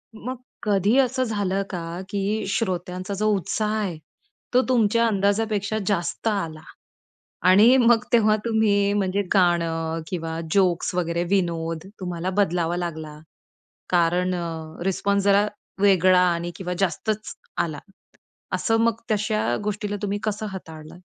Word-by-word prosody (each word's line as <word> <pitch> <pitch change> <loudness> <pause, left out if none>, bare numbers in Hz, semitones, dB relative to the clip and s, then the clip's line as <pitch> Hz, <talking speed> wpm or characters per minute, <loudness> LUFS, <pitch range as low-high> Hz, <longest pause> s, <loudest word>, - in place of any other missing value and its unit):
मग 250 +4 -5 0.3
कधी 205 +2 +2
असं 260 0 +2
झालं 200 -4 -1
का, 170 -1 -5
की 205 +1 -1
श्रोत्यांचा 185 -2 -2
जो 210 +2 0
उत्साह 210 +3 -1
आहे 195 -6 -2 0.6
तो 250 - +6
तुमच्या 230 -2 +3
अंदाजापेक्षा 205 0 0
जास्त 175 +1 -1
आला. 165 -8 -2 0.9
आणि 210 +7 +7
मग 235 -3 +4
तेव्हा 215 -2 +5
तुम्ही 205 -3 +2
म्हणजे 200 -1 0
गाणं 165 -3 +1
किंवा 165 -2 -4
जोक्स 185 -3 +2
वगैरे 170 -1 0
विनोद 165 -3 -1
तुम्हाला 180 -1 -3
बदलावा 175 -3 +1
लागला? 160 -3 -5 0.7
कारण 180 +1 +2
अ, 165 -1 -6
रिस्पॉन्स 200 +1 +1
जरा 200 +1 +4 0.3
वेगळा 185 -2 +5
आणि 170 0 -3
किंवा 180 -1 -4
जास्तच 205 +4 -1 0.2
आला. 155 -3 -1 0.8
असं 225 -1 +1
मग 230 0 +1
तशा 215 - 0
गोष्टीला 205 0 -2
तुम्ही 205 0 -1
कसं 215 0 -2
हाताळलात? 160 -3 -10
195 Hz, 125 wpm, -24 LUFS, 170-210 Hz, 0.9 s, आणि